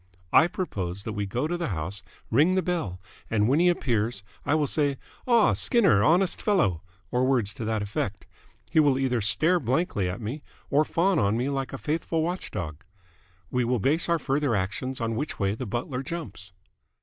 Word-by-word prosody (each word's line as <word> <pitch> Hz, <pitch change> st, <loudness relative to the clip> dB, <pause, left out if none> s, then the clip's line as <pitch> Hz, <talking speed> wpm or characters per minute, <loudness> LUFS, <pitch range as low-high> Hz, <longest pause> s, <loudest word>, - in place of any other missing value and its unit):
I 160 Hz, -, +7 dB
propose 100 Hz, -, -4 dB
that 110 Hz, -, -4 dB
we 105 Hz, -1 st, -2 dB
go 120 Hz, +8 st, -1 dB
to 175 Hz, +3 st, -1 dB
the 170 Hz, -, -2 dB
house, 90 Hz, +1 st, -4 dB, 0.3 s
ring 155 Hz, +10 st, +4 dB
the 185 Hz, -, +1 dB
bell, 160 Hz, -, -2 dB, 0.3 s
and 105 Hz, -1 st, +2 dB
when 140 Hz, +5 st, +3 dB
he 180 Hz, +1 st, +5 dB
appears, 115 Hz, -, 0 dB, 0.2 s
I 145 Hz, -, +3 dB
will 155 Hz, -1 st, +2 dB
say 145 Hz, -1 st, 0 dB, 0.3 s
'Ah, 235 Hz, -3 st, +5 dB
Skinner! 195 Hz, -, +3 dB
Honest 180 Hz, -, +3 dB
fellow!' 100 Hz, -, +2 dB, 0.3 s
or 125 Hz, +1 st, +1 dB
words 120 Hz, -6 st, +1 dB
to 110 Hz, -, -6 dB
that 110 Hz, -1 st, -1 dB
effect. 100 Hz, 0 st, -3 dB, 0.5 s
He 160 Hz, -, +4 dB
will 145 Hz, -4 st, +4 dB
either 130 Hz, -3 st, 0 dB
stare 160 Hz, -, +3 dB
blankly 125 Hz, -, 0 dB
at 90 Hz, -, -5 dB
me 120 Hz, +7 st, -5 dB, 0.3 s
or 145 Hz, +2 st, +4 dB
fawn 180 Hz, +3 st, +2 dB
on 100 Hz, +1 st, +2 dB
me 125 Hz, +3 st, 0 dB
like 135 Hz, -1 st, -2 dB
a 135 Hz, -, -5 dB
faithful 160 Hz, +2 st, -1 dB
watchdog. 95 Hz, -, -4 dB, 0.7 s
We 125 Hz, -, +1 dB
will 125 Hz, +1 st, +1 dB
base 150 Hz, -, +1 dB
our 170 Hz, -, +3 dB
further 140 Hz, -4 st, 0 dB
actions 105 Hz, +7 st, -2 dB
on 115 Hz, -1 st, -1 dB
which 145 Hz, +6 st, -3 dB
way 100 Hz, -1 st, 0 dB
the 120 Hz, +3 st, -5 dB
butler 125 Hz, +4 st, -3 dB
jumps." 125 Hz, -, -7 dB
130 Hz, 190 wpm, -26 LUFS, 105-160 Hz, 0.7 s, I